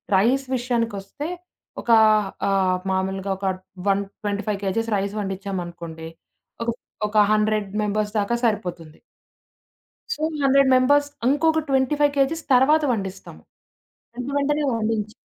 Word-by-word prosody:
Rice 250 +8 +3
విషయానికొస్తే 235 +1 -2 0.5
ఒక - - -11 0.6
ఆహ్, 190 -2 +2
మామూలుగా 190 +1 -1
ఒక 195 - -6 0.4
125 200 +1 -1
కేజీస్ 225 +4 -1
రైస్ 200 +1 -2
వండచ్చామనుకోండి. 175 -4 -5 0.6
ఒక 235 - -2 0.4
ఒక 210 0 +2
100 215 -1 +1
మెంబర్స్ 210 0 -1
దాకా 205 +4 0
సరిపోతుంది. 175 -7 -3 1.1
సో, 305 - -9 0.2
100 275 0 +4
మెంబర్స్ 285 +3 +3 0.2
ఇంకొక 315 +3 +2
25 285 +2 +2
కేజీస్ 300 +4 +1
తర్వాత 295 +5 +5
వండిస్తాం. 195 -3 -6 0.8
వెంట 250 +2 -5
వెంటనే 295 +1 +1
వండించ 215 -1 -1
215 Hz, 105 wpm, -23 LUFS, 195-265 Hz, 1.1 s, తర్వాత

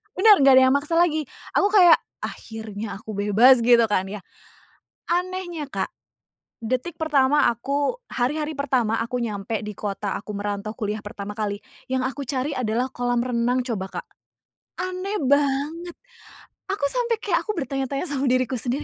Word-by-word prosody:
bener 415 +3 +7
nggak 275 -1 +7
ada 260 - +7
yang - - +3
maksa 295 +4 -1
lagi. 315 -3 +2 0.3
Aku 400 - +4
kayak, 360 -5 +8 0.3
"Akhirnya 220 -2 -6
aku 220 - -8
bebas." 215 +6 +5
gitu 240 0 +6
kan 205 -3 +1
ya. 210 - -5 0.9
Anehnya 355 -3 -2
Kak, - - -1 0.8
detik 255 +8 -2
pertama 295 -2 +3
aku 280 - -1 0.2
hari-hari 300 +5 -1
pertama 250 -5 +1
aku 235 +2 -2
nyampe 210 0 -3
di 210 - -5
kota 200 0 -3
aku 210 - -8
merantau 205 +1 -3
kuliah 210 0 -3
pertama 205 0 -7
kali, 205 -2 -2 0.3
yang 260 0 +1
aku 270 +2 -3
cari 270 +2 -1
adalah 245 +1 0
kolam 245 -1 -1
renang 245 0 0
coba 220 -6 -3
Kak. - - -37 0.7
Aneh 370 +3 -3
banget. 290 +5 0 0.7
Aku 390 -7 -1
sampe 480 -2 0
kayak 355 -5 +1
aku - - +1
bertanya-tanya 275 -2 -2
sama 275 -2 -1
diriku 255 0 +1
sendiri 250 +5 -2
260 Hz, 155 wpm, -23 LUFS, 220-300 Hz, 0.9 s, kayak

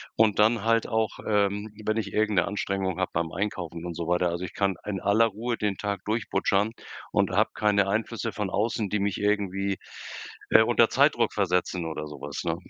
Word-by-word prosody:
und 110 -2 +3
dann 110 0 +4
halt 115 0 +2
auch, 110 -2 0 0.2
ähm, 105 0 +1 0.2
wenn 110 +1 +1
ich 105 -3 -3
irgend 105 -2 +1
'ne - - +2
Anstrengung 95 -2 -2
habe 95 - -1
beim 85 -1 -1
Einkaufen, 85 -4 -4
und 85 -1 -5
so 85 -1 -3
weiter. 90 0 +2
Also, 85 +2 -3
ich - - -9
kann 100 -2 0
in 100 -3 -3
aller 105 +3 +4
Ruhe 105 0 -10 0.2
den 105 -2 -1
Tag 100 -2 -3
durchbutschern 105 -1 +1 0.4
und - - +2
habe - - +3
keine 100 -2 +2
Einflüsse 115 +2 -1
von 105 -1 -3
außen 110 0 0
die 105 - 0
mich 100 -1 -1
irgendwie, 100 -2 0 0.7
äh, - - +7
unter - - +4
Zeitdruck - - +3
versetzen 90 -2 0
oder 75 -1 -4
so 75 -2 -9
was, 70 0 -5
ne? 85 -1 0
100 Hz, 200 wpm, -27 LUFS, 90-105 Hz, 0.7 s, äh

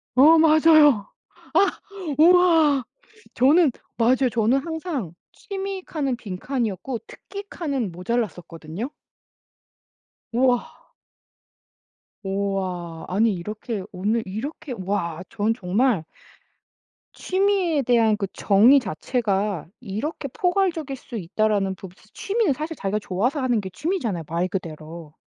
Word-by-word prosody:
어 310 +5 +7
맞아요. 310 -7 +6 0.5
아 400 - +3 0.4
우와. 325 -4 +5 0.5
저는 285 +4 +5 0.3
맞아요. 250 +2 +3
저는 235 +3 +2
항상 315 - -4 0.2
취미 390 -1 -5
칸은 275 -8 -2
빈칸이었고 230 +2 -3
특기 400 0 -9
칸은 275 - -3
모자랐었거든요. 180 - -4 1.4
와. 245 0 +2 1.5
우와. 190 -4 -3
아니 215 +4 +2
이렇게 210 +3 -5
오늘 210 +5 -1
이렇게 265 +8 -6
와 185 -3 -3
전 215 +1 0
정말 215 -1 +1 1.1
'취미에 375 -5 +1
대한 230 -3 +3
그 205 - -2
정의 225 +8 +5
자체가 205 - -2
이렇게 245 +8 -4
포괄적일 350 -5 0
수 245 -2 -8
있다.'라는 200 +1 0
부 190 0 -10 0.2
취미는 410 -6 0
사실 310 +4 -5
자기가 200 +2 -1
좋아서 235 - -1
하는 245 -4 +1
게 190 - -5
취미잖아요 225 - -2
말 170 +2 -1
그대로. 160 -3 -7
235 Hz, 235 characters per minute, -23 LUFS, 195-300 Hz, 1.5 s, 어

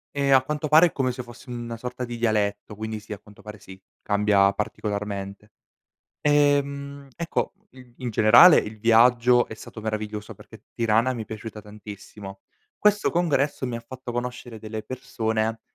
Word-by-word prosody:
Ehm, 140 -1 +2
a 130 - +6
quanto 150 +2 -3
pare 160 +4 +7
è - - -7
come 130 -2 -1
se 125 +1 -6
fosse 120 +1 -14
una 120 -1 -6
sorta 125 +2 -6
di 120 -1 -5
dialetto, 105 -2 -1
quindi 110 +1 -5
sì, 105 0 -8
a 100 - -9
quanto 105 0 -18
pare, 105 -1 -10
sì, 95 +1 -13 0.2
cambia 100 -1 +3
particolarmente. 100 0 -5 0.7
Ehm, 140 -1 +1
ecco, 170 0 -2 0.2
i 125 -2 -17
in 125 -2 -4
generale 120 - +7
il 110 +1 -4
viaggio 120 +2 +4
è - - -8
stato 110 - -11
meraviglioso, 110 -1 -5
perché - - -16
Tirana 115 +2 +1
mi 115 - -5
è - - -8
piaciuta 110 0 -8
tantissimo. 105 -1 -11 0.4
Questo 210 0 +2
congresso 150 -6 0
mi 120 -2 -3
ha - - -7
fatto 125 +2 -9
conoscere 120 -1 -5
delle 110 0 -6
persone 110 -2 -3
115 Hz, 170 wpm, -24 LUFS, 105-130 Hz, 0.7 s, pare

